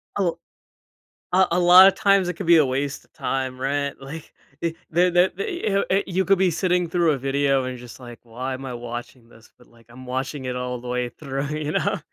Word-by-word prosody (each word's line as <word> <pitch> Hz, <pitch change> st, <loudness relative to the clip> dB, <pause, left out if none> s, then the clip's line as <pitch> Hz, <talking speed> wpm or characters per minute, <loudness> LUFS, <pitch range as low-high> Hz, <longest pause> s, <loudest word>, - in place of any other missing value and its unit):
A 185 Hz, -4 st, +1 dB, 1.0 s
a 185 Hz, +1 st, +4 dB
a 175 Hz, -, +2 dB
lot 180 Hz, +2 st, +9 dB
of 195 Hz, -, +3 dB
times 195 Hz, -2 st, +3 dB
it -, -, -2 dB
could 175 Hz, +2 st, -7 dB
be 170 Hz, -1 st, +7 dB
a 150 Hz, -, +5 dB
waste 135 Hz, +2 st, -3 dB
of -, -, -36 dB
time, 130 Hz, -1 st, -3 dB
right? 140 Hz, +1 st, -1 dB
Like, 145 Hz, +4 st, -10 dB, 0.3 s
it 165 Hz, -1 st, -2 dB
the 175 Hz, +2 st, +3 dB
the 175 Hz, +2 st, +3 dB
the 350 Hz, -, -1 dB
i 190 Hz, -, +4 dB
uh, 200 Hz, -, +2 dB
you 190 Hz, +1 st, 0 dB
could 195 Hz, +1 st, +4 dB
be 185 Hz, -2 st, +3 dB
sitting 180 Hz, 0 st, 0 dB
through 170 Hz, -1 st, +2 dB
a 140 Hz, -, 0 dB
video 135 Hz, 0 st, +1 dB
and 130 Hz, 0 st, -5 dB
just 120 Hz, +1 st, -12 dB
like, 120 Hz, -2 st, -11 dB
why 125 Hz, +3 st, -5 dB
am 135 Hz, +1 st, -7 dB
I 125 Hz, -, -5 dB
watching 120 Hz, 0 st, -8 dB
this? 110 Hz, 0 st, -19 dB
But, 125 Hz, -, -21 dB
like, 115 Hz, -1 st, -23 dB
I'm 130 Hz, +2 st, -12 dB
watching 130 Hz, +2 st, -4 dB
it 125 Hz, -, -3 dB
all 125 Hz, -1 st, -4 dB
the 125 Hz, -, -9 dB
way 125 Hz, 0 st, -2 dB
through, 135 Hz, +1 st, -5 dB
you 150 Hz, 0 st, -3 dB
know? 200 Hz, +4 st, 0 dB
140 Hz, 235 wpm, -23 LUFS, 125-180 Hz, 1.0 s, lot